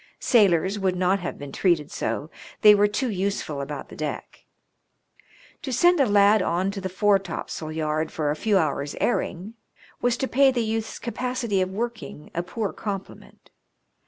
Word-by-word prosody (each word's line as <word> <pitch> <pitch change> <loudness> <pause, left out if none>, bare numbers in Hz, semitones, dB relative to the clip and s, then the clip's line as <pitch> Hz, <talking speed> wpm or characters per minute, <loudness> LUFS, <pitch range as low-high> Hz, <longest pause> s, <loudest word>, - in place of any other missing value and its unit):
Sailors 195 - +3
would 190 -2 0
not 185 +2 +2
have 175 - -5
been 140 -1 -8
treated 165 -3 +1
so; 150 - -3 0.3
they 210 -1 +9
were 205 0 +4
too 230 +4 -2
useful 190 -7 -2
about 140 0 -6
the - - -11
deck. 150 -1 -6 1.2
To 270 - -5
send 345 +7 +4
a 275 - +4
lad 205 0 +5
on 185 +2 0
to 200 -1 -6
the 190 - -3
foretopsail 190 -5 -1
yard 155 0 -2
for 150 -2 -1
a - - -1
few 205 +5 +1
hours* 145 -4 -1
airing 205 -3 -1 0.5
was 245 -1 +1
to 265 - -1
pay 275 +2 +4
the 245 -3 0
youth's 220 0 -3
capacity 240 -4 -2
of 185 - 0
working 220 -6 -6
a 170 - -1
poor 200 +4 -4
compliment. 195 -3 -8
195 Hz, 165 wpm, -24 LUFS, 165-220 Hz, 1.2 s, they